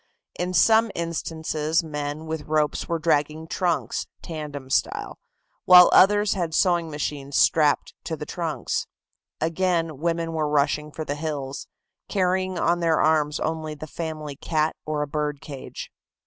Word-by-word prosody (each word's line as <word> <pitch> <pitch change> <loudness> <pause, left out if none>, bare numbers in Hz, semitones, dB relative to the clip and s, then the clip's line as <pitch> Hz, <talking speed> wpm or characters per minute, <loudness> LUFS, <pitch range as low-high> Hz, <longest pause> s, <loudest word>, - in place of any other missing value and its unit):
In 180 +1 -1
some 225 +5 +5
instances 160 -1 -1
men 150 0 -4
with 160 -2 -5
ropes 155 -1 0
were 170 - +1
dragging 155 -1 0
trunks, 175 -1 -1 0.2
tandem 145 -5 -6
style, - - -1 0.5
while 180 -1 +9
others 205 +1 +5
had 170 -4 -2
sewing 175 -3 +2
machines 145 -2 -3
strapped 150 -3 +3
to 160 - -3
the 150 - -6
trunks. 165 -2 -3 0.5
Again, 165 -2 0
women 165 0 -1
were 155 -2 0
rushing 150 +1 +1
for 155 +1 -6
the 145 - -2
hills, 145 -2 -4 0.4
carrying 185 -1 0
on 170 +1 +2
their 165 -2 +2
arms 150 -1 +2
only 155 -1 -3
the 150 - -8
family 155 -2 -5
cat 155 +2 0
or 150 -1 -1
a - - -5
bird 150 -1 -2
cage. 140 -3 -8
160 Hz, 145 wpm, -24 LUFS, 150-170 Hz, 0.5 s, while